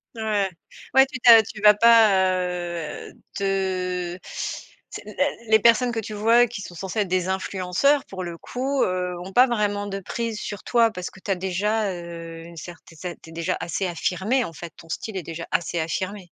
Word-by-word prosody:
Ouais, 210 -3 0 0.4
ouais, 265 0 +7
tu 265 -2 -7
tu 240 - +5
as 225 -1 +10
tu 215 0 -9
vas 210 0 +8
pas, 230 +1 +6 1.0
heu, - - -15 0.3
te 185 -2 -1
tu 185 - -15 0.7
sais? - - -7
Les 285 +1 0 0.2
les 220 0 +6
personnes 235 +2 +4
que 230 - -2
tu 215 0 -6
vois 230 +3 +4
qui 220 -3 -7
sont 180 - -9
censées 190 +5 -4
être 195 - -2
des 185 0 0
influenceurs 190 +9 +1
pour 190 -1 -7
le 170 -1 -6
coup, 265 +6 -2
heu, 180 0 -1
ont 185 +2 -9
pas 250 +4 +7
vraiment 205 -4 -1
de 195 0 -4
prise 225 +2 -4
sur 205 -2 -6
toi 235 -2 +3
parce 180 -4 -6
que - - -16
tu 195 - -4
as - - +2
déjà, 200 +3 -1
heu, 170 -2 -8
une 170 0 -12
certaine 165 0 -11
c 175 +1 -6
tu 165 - -13
es - - -12
déjà 170 +2 -2
assez 175 +3 -2
affirmé, 190 +8 0
en 165 - -8
fait, 165 +1 -9
ton 165 - -14
style 195 +5 -5
est 185 - -4
déjà 165 +1 -6
assez 170 0 0
affirmé. 190 +5 -3
195 Hz, 210 wpm, -24 LUFS, 180-225 Hz, 1.0 s, as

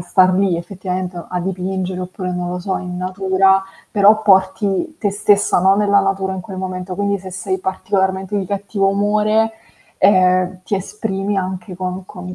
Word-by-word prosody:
star 185 +1 +3
lì 190 -2 +2
effettivamente 180 0 -4
o 170 - -8
a 180 - -2
dipingere 185 0 -3
oppure 185 0 -5
non 180 0 -3
lo 180 - -3
so 190 +1 -2
in 180 -1 -6
natura, 190 +1 +2 0.3
però 210 +1 +5
porti 195 - +2
te 205 - 0
stessa, 205 -1 +2
no, 190 +2 +5
nella 200 -1 +4
natura 195 -1 -1
in 190 - -4
quel 190 +1 -9
momento, 185 0 -4
quindi 200 0 0
se 190 0 -9
sei 190 +1 -3
particolarmente 190 +1 -1
di 190 - -3
cattivo 200 0 -1
umore, 210 +2 +2 0.5
ehm, 185 -1 +3
ti 205 - -1
esprimi 195 0 -3
anche 185 -1 -4
con 185 0 -4
con 180 -1 -8
190 Hz, 170 wpm, -18 LUFS, 185-200 Hz, 0.5 s, però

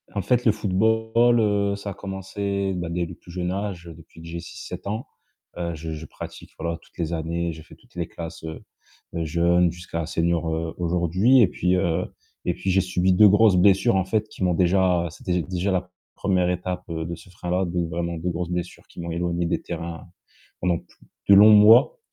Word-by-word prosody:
En 100 - 0
fait, 125 +3 +1
le 110 - +6
football, 110 +4 +2
heu, 100 -2 +1
ça 100 0 -6
a - - -5
commencé, 100 0 -3
bah, 85 -1 -3
dès 85 0 -1
le - - -9
plus 85 - -14
jeune 90 0 -2
âge 95 -4 -4
depuis 80 0 -15
que 85 - -10
j'ai 85 +1 -5
6-7 85 +3 -8
ans, 110 +4 -3 0.5
heu, 85 -1 -3
je 80 +1 -6
je 80 +1 -6
pratique, - - -10
voilà, 85 +1 -3
toutes - - -24
les 85 -2 -2
années, 85 +1 -2
j'ai 80 0 -10
fait - - -16
toutes 125 -1 -27
les 85 -2 -3
classes, 85 -1 -8
heu 80 0 -7 0.5
heu, 85 -1 -1
jeunes 85 +2 +3
jusqu'à 85 -1 -5
senior, 85 0 0
heu, 80 0 -3
aujourd'hui 90 +8 +3
et 110 - +6
puis, 90 +1 0
heu 90 -1 0 0.4
et - - +1
puis 95 - -4
j'ai 95 - +3
subi 95 0 +1
2 105 +3 +7
grosses 105 -1 +5
blessures, 95 +3 +4
en 95 - +1
fait, 110 +2 -1
qui - - -6
m'ont 90 - +2
déjà 90 0 +2
c'était, 90 +1 -2
déjà, 90 +3 -2
la 90 0 -2 0.2
1re 90 -2 +1
étape 90 0 -3
de 85 +1 -4
ce - - -16
frein-là 90 +1 -2
donc, 85 -1 -2
vraiment, 85 0 -3
2 85 +3 -2
grosses 85 +1 -3
blessures 90 -1 -5
qui - - -10
m'ont 85 0 -5
éloigné 85 0 -1
des 85 - -1
terrains 85 +1 -6 0.5
pendant 90 -1 +1
plu - - -24 0.3
de 100 - +9
longs 105 +2 +9
mois, 110 - +7
90 Hz, 210 wpm, -24 LUFS, 85-100 Hz, 0.5 s, de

